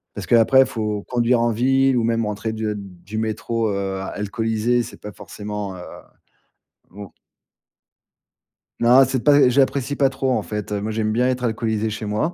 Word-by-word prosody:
parce - - -6
qu'après, 120 +3 +5
faut 105 -5 -3
conduire 120 -1 +2
en 120 0 +2
ville 135 +3 +2
ou 120 - +1
même 115 -1 0
rentrer 105 +2 -3
de 110 -1 -3
du 95 +1 -9
métro, 110 0 -2
heu, 100 -1 -3
alcoolisé. 110 +4 -1
C'est 115 - -11
pas 105 - -8
forcément, 105 -1 -7
heu, - - -10 1.1
mon 100 0 -11 1.7
Non, 125 +3 +6
c'est 130 -1 -2
pas 145 -3 +5
j'apprécie 135 +1 +1
pas 135 -1 +3
trop. 135 0 -2
En 110 -4 0
fait, 105 0 -5
heu, 105 - -1
moi, 105 +2 -3
j'aime 110 0 -1
bien 125 +3 +1
être 125 -1 -2
alcoolisé 110 -1 -1
chez 110 +1 -6
moi 105 +11 -1
110 Hz, 170 wpm, -21 LUFS, 105-125 Hz, 1.7 s, Non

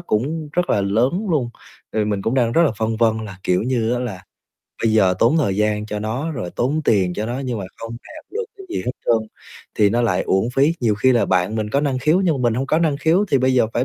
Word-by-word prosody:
cũng 150 +2 -2
rất 180 +2 0
là 100 - +2
lớn 125 - +1
luôn. 130 -7 0 0.4
Ờ, 110 -1 +1
mình 105 -2 -2
cũng 115 - 0
đang 120 -3 +2
rất 170 - +4
là 165 - +3
phân 110 0 -1
vân 110 -1 +2
là, 95 -3 -9
kiểu 90 +1 +1
như, 120 -2 0
á - - -1
là 105 -8 -5 0.6
bây 115 - +2
giờ 95 -4 +4
tốn 120 +8 +3
thời 100 -11 0
gian 105 0 0
cho 105 -1 -4
nó 120 +10 -3
rồi 110 -11 -5
tốn 145 +6 0
tiền 95 -7 +2
cho 110 - -3
nó 120 +2 -3
nhưng 125 -5 -3
mà 95 - -5
không 115 0 -7
đạt 310 0 -13
được 460 +2 -2
cái 390 -1 -11
gì 355 - -2
hết 125 - 0
trơn 110 -2 +2 0.5
thì 105 -2 +3
nó 120 +2 +1
lại 95 -6 +1
uổng 95 +4 +1
phí. 145 +5 +3
Nhiều 110 -4 +2
khi 130 +5 +3
là 120 - +2
bạn 95 +3 +1
mình 105 -1 -2
có 140 - +2
năng 140 -3 0
khiếu 155 +7 +2
nhưng 180 -5 +2
mà 120 - +4
mình 110 - -1
hông 130 +3 -2
có 155 - +2
năng 160 -4 +1
khiếu, 160 +7 +2
thì 135 - +4
bây 130 0 +2
giờ 125 - +4
phải 120 - +1
120 Hz, 275 wpm, -20 LUFS, 105-140 Hz, 0.6 s, rất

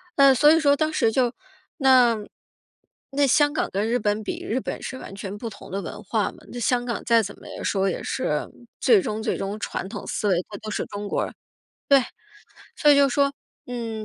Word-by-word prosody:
嗯， 275 -2 +6
所 295 +4 +6
以 325 - +5
说 285 -2 +4
当 310 +1 0
时 225 - +2
就， 245 0 +1 0.4
那 255 -4 +5 0.9
那 280 +1 +2
香 290 +3 +4
港 - - 0
跟 205 +3 -1
日 245 - +2
本 210 -1 -1
比， - - -5
日 245 +4 -1
本 - - -5
是 260 - -6
完 - - -9
全 200 0 -6
不 230 +1 -5
同 195 - -12
的 200 +1 -2
文 205 +4 -8
化 210 +1 0
嘛， - - -18
那 245 - -6
香 245 +1 +1
港 235 - -3
再 230 -1 +4
怎 200 - -6
么 - - -22 0.2
说 195 -1 +1
也 - - -4
是 150 0 -1 0.3
最 430 -5 +5
终 215 -6 -3
最 - - 0
终 200 +2 -4
传 190 - -4
统 - - -7
思 210 - -2
维， 185 - +3
他 205 - -7
都 215 - -7
是 - - -2
中 205 0 -6
国 - - 0
人 - - -8 0.6
对， 275 -2 +6 0.7
所 295 - +4
以 285 - +7
就 280 -1 +5
说， 280 +2 +2 0.3
嗯， 230 -3 -5
235 Hz, 235 characters per minute, -24 LUFS, 210-275 Hz, 0.9 s, 以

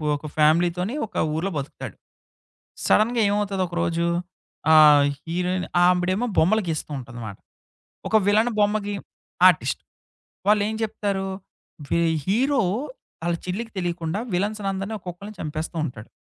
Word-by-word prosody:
ఒక 145 - -8
ఫ్యామిలీతోని 175 - +2
ఒక 210 - -18 0.2
ఊర్లో 180 +5 -1
బతుకుతాడు. 140 0 -6 0.9
సడెన్‌గా 230 +3 +3
ఏమవుతది 205 -2 0
ఒక 175 - -9
రోజు? 170 0 0 0.7
ఆహ్, 150 -2 +8 0.2
హీరోయిన్ 180 +2 -1 0.2
ఆవిడేమో 180 +6 +2
బొమ్మలుగీస్తూ 170 -4 +1
ఉంటందమాట. 115 -5 -8 0.7
ఒక 220 - +3
విలాన్ 215 +4 +4
బొమ్మకి 205 0 +1 0.5
ఆర్టిస్ట్. - - +1 0.7
వాళ్ళు 210 -1 +4
ఏం 220 - -3
చెప్తారు? 200 -3 -2 0.6
వి 170 - +2 0.2
హీరో 255 +6 +2 0.6
ఆళ్ళ 170 0 +1
చిల్లికి 225 +5 -3
తెలియకుండా. 175 0 -2 0.2
విలన్సనందరిని 200 +1 -2
ఒక్కొక్కళ్ళని 185 +4 -8
చంపేస్తూ 155 +2 -4
ఉంటాడు. 120 -6 -8
185 Hz, 110 wpm, -24 LUFS, 165-210 Hz, 0.9 s, ఆహ్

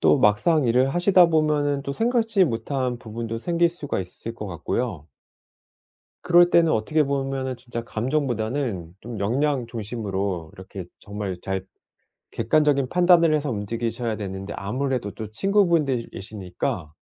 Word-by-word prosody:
또 - - +5
막상 130 +8 +3
일을 125 +2 +3
하시다 180 0 +5
보면은 150 -3 +1
또 140 0 -3
생각지 225 - +2
못한 125 -1 -2
부분도 115 0 -5
생길 170 +6 +2
수가 155 - -3
있을 95 +5 -7
것 105 - -6
같고요. 90 - -3 1.2
그럴 175 0 +5
때는 165 -2 +5
어떻게 155 +9 +2
보면은 135 -2 -2
진짜 120 -1 -6
감정보다는 115 - -2
좀 115 -1 -7
역량 130 +4 0
중심으로 100 -7 -3
이렇게 95 -1 -8 0.2
정말 100 -2 -5
잘 95 -1 -3 0.7
객관적인 145 -4 +2
판단을 175 -2 +5
해서 145 -2 -1
움직이셔야 115 +2 -2
되는데 95 -1 -5
아무래도 125 +1 -2
또 110 +2 -7
친구분들이시니까 115 - -1
125 Hz, 315 characters per minute, -24 LUFS, 105-150 Hz, 1.2 s, 또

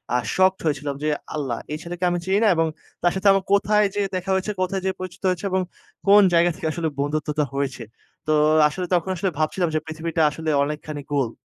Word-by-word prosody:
আ - - +5 0.2
shocked 190 0 +3
হয়েছিলাম 145 -2 -1
যে, - - 0 0.3
আল্লাহ 135 -6 -2
এই 150 - -2
ছেলেকে 175 +1 -6
আমি 175 - 0
চিনি 190 +2 +2
না। - - +5
এবং 165 0 +2 0.3
তার 175 0 +3
সাথে 190 +1 0
আমার 195 -1 +1
কোথায় 210 +1 +3
যেয়ে 205 -1 0
দেখা 185 +1 -4
হয়েছে, 190 +3 -1
কোথায় 190 +1 -1
যেয়ে 190 - 0
পরিচিত 185 -1 -7
হয়েছে 180 +1 -2
এবং 185 0 +2 0.5
কোন 205 +1 +8
জায়গা 170 +1 +5
থেকে 175 -4 -4
আসলে 165 0 -2
বন্ধুত্বটা 150 +1 -1
হয়েছে। 140 -2 -2 0.5
তো 155 - +2 0.4
আসলে 180 +4 -4
তখন 175 +1 +1
আসলে 185 +2 -1
ভাবছিলাম 170 +3 0
যে, 155 - +3
পৃথিবীটা 160 +1 -3
আসলে 160 0 -4
অনেকখানি 150 0 -5
গোল। 135 -5 +1
170 Hz, 205 wpm, -23 LUFS, 150-190 Hz, 0.5 s, কোন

